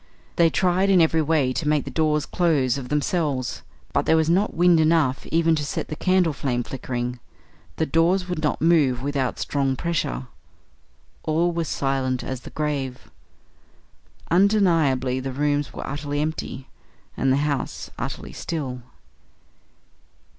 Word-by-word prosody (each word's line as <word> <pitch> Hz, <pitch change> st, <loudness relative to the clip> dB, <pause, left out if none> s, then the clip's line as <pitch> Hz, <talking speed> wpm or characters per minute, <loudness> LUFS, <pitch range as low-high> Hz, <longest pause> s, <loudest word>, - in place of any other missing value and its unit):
They 170 Hz, -1 st, +5 dB
tried 185 Hz, +3 st, +2 dB
in 190 Hz, -2 st, +5 dB
every 160 Hz, -1 st, +3 dB
way 150 Hz, -4 st, +1 dB
to 150 Hz, -, -2 dB
make 150 Hz, -1 st, +2 dB
the -, -, -6 dB
doors 150 Hz, -2 st, +1 dB
close 150 Hz, -8 st, +1 dB
of 130 Hz, -3 st, -6 dB
themselves, 150 Hz, -4 st, -1 dB, 0.3 s
but -, -, +1 dB
there 160 Hz, -, +5 dB
was 160 Hz, 0 st, +2 dB
not 195 Hz, +5 st, +1 dB
wind 175 Hz, -1 st, +5 dB
enough 155 Hz, -5 st, +2 dB
even 165 Hz, 0 st, +2 dB
to 150 Hz, -2 st, 0 dB
set 145 Hz, -, -4 dB
the 155 Hz, -, -4 dB
candle 185 Hz, -2 st, +2 dB
flame 125 Hz, -3 st, -1 dB
flickering. 125 Hz, -1 st, -4 dB, 0.6 s
The 160 Hz, -, 0 dB
doors 170 Hz, +5 st, +2 dB
would 180 Hz, -3 st, -3 dB
not 150 Hz, 0 st, -1 dB
move 145 Hz, -7 st, +3 dB
without 140 Hz, -3 st, -1 dB
strong 135 Hz, -2 st, 0 dB
pressure. 130 Hz, -, -2 dB, 1.0 s
All 165 Hz, +3 st, +1 dB
was 165 Hz, -1 st, -2 dB
silent 135 Hz, -2 st, -1 dB
as 130 Hz, -1 st, -4 dB
the -, -, -10 dB
grave. 140 Hz, -4 st, -3 dB, 1.2 s
Undeniably 165 Hz, -10 st, +3 dB
the 135 Hz, +1 st, -4 dB
rooms 145 Hz, +1 st, 0 dB
were -, -, -6 dB
utterly 145 Hz, +1 st, -3 dB
empty, 150 Hz, -3 st, -4 dB, 0.5 s
and 135 Hz, -, +1 dB
the 135 Hz, -, +3 dB
house 145 Hz, -2 st, -2 dB
utterly -, -, -5 dB
still. 135 Hz, -7 st, -4 dB
150 Hz, 145 wpm, -23 LUFS, 135-165 Hz, 1.2 s, They